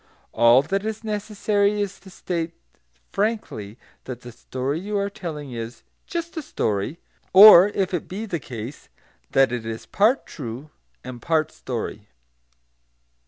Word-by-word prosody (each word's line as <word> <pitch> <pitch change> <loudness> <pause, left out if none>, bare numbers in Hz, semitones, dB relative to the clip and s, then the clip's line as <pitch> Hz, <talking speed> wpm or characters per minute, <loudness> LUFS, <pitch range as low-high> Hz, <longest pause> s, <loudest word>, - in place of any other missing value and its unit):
All 120 +3 +5
that 195 +6 -1
is 220 +1 -4
necessary 210 -1 0
is 200 -1 -3
to 195 - -14
state 170 -2 -4 0.6
frankly 195 - -2 0.3
that 125 -2 -7
the 120 - -10
story 130 +5 -3
you 205 +3 -3
are 200 0 -1
telling 160 -9 -6
is 115 0 -7 0.2
"just 340 -2 -4
a 320 - -2
story," 105 - -2 0.4
or 195 -1 +11
if 195 -2 -2
it 175 - -2
be 205 +5 -5
the 175 -6 -3
case 120 0 -8 0.4
that 135 -2 +4
it 120 -2 -3
is 115 0 -6
"part 220 +7 +2
true 135 +1 -8 0.3
and 125 -2 -8
part 160 -2 +1
story." 110 -4 -5
165 Hz, 145 wpm, -23 LUFS, 125-205 Hz, 0.6 s, or